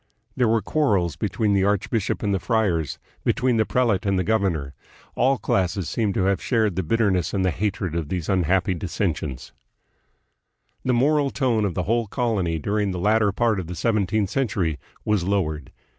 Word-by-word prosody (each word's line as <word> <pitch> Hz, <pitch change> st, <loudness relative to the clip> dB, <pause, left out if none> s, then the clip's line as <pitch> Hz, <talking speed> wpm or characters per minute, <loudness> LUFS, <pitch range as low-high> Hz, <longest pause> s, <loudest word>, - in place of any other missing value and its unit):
There 125 Hz, -2 st, +2 dB
were 110 Hz, -1 st, +2 dB
quarrels 100 Hz, -, +1 dB
between 105 Hz, -2 st, 0 dB
the 95 Hz, -1 st, +3 dB
archbishop 105 Hz, +2 st, 0 dB
and 100 Hz, -1 st, +1 dB
the 95 Hz, -, +1 dB
friars, 90 Hz, -, 0 dB, 0.3 s
between 125 Hz, -2 st, +1 dB
the 110 Hz, -, +2 dB
prelate 115 Hz, -7 st, +1 dB
and 100 Hz, -1 st, +1 dB
the 90 Hz, -, +1 dB
governor. 90 Hz, -10 st, 0 dB, 0.4 s
All 135 Hz, +2 st, +2 dB
classes 95 Hz, -4 st, 0 dB
seem 105 Hz, +4 st, 0 dB
to 95 Hz, -, 0 dB
have 95 Hz, -1 st, +1 dB
shared 110 Hz, -7 st, +1 dB
the 95 Hz, -, 0 dB
bitterness 95 Hz, -1 st, +1 dB
and 95 Hz, -1 st, +1 dB
the 90 Hz, -, +2 dB
hatred 100 Hz, -1 st, -2 dB
of 80 Hz, -3 st, -3 dB
these 90 Hz, -4 st, -3 dB
unhappy 95 Hz, 0 st, +2 dB
dissensions. 85 Hz, -, -3 dB, 1.3 s
The 130 Hz, -, +1 dB
moral 145 Hz, +3 st, +3 dB
tone 120 Hz, -7 st, +1 dB
of 95 Hz, -, -2 dB
the 90 Hz, -, 0 dB
whole 115 Hz, +2 st, 0 dB
colony 100 Hz, -9 st, -1 dB
during 100 Hz, +6 st, -1 dB
the 90 Hz, -, -3 dB
latter 105 Hz, +2 st, +3 dB
part 110 Hz, 0 st, +1 dB
of 90 Hz, -, -5 dB
the 90 Hz, -, -6 dB
seventeenth 105 Hz, +1 st, 0 dB
century 100 Hz, -, -1 dB, 0.3 s
was 105 Hz, -4 st, +1 dB
lowered. 85 Hz, -6 st, -1 dB
100 Hz, 175 wpm, -23 LUFS, 90-110 Hz, 1.3 s, the